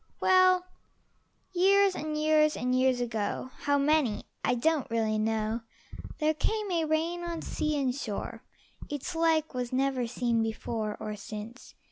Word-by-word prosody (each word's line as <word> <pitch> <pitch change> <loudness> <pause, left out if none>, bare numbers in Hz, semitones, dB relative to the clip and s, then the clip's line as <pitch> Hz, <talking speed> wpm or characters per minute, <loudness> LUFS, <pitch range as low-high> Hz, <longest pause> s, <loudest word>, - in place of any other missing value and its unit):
Well, 370 -1 +5 0.9
years 390 +2 +4
and 305 -2 -3
years 305 0 +3
and 250 +1 0
years 255 -1 +3
ago 230 +1 -2
How 285 0 +2
many 285 -5 +2 0.2
I 245 - +2
don't 310 +3 +1
really 220 -2 0
know 220 +1 0 0.6
There 310 0 +2
came 420 +5 -1
a 335 -2 +1
rain 325 +3 -1
on 340 -1 -4
sea 305 -1 -1
and 260 -2 +1
shore; 230 -2 -5 0.5
Its 290 -2 -4
like 325 -2 +2
was 250 -1 -3
never 260 -1 0
seen 235 -1 0
before 220 -1 -3
Or 210 0 -4
since. 215 +4 -9
275 Hz, 145 wpm, -29 LUFS, 230-315 Hz, 0.9 s, Well